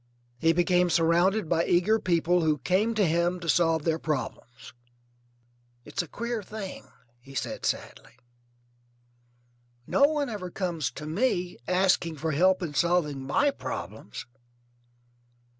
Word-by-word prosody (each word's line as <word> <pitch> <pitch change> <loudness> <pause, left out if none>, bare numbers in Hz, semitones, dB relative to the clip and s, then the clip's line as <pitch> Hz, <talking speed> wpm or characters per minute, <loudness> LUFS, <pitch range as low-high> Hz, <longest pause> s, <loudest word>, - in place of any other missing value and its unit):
He 165 +3 +4
became 175 +1 +2
surrounded 175 +4 +2
by 165 - +2
eager 190 +7 +3
people 175 -1 +2
who 155 -2 +2
came 205 +8 +1
to 210 -2 +3
him 170 +2 +1
to 170 - -8
solve 165 -1 +2
their 165 0 0
problems. 130 -6 -5 1.1
"It's 150 +6 -2
a 175 - -8
queer 235 +5 -4
thing," 200 -1 -8 0.3
he 135 +3 -14
said - - -3
sadly; - - -4 1.7
"no 280 - +4
one 295 -1 0
ever 205 -6 -5
comes 170 -5 -2
to 150 - -8
me 180 +1 -1
asking 180 -3 +2
for 155 +2 -2
help 185 +5 +3
in 155 -4 -4
solving 150 -3 +1
my 285 - +3
problems." 105 - -7
175 Hz, 130 wpm, -27 LUFS, 160-190 Hz, 1.7 s, He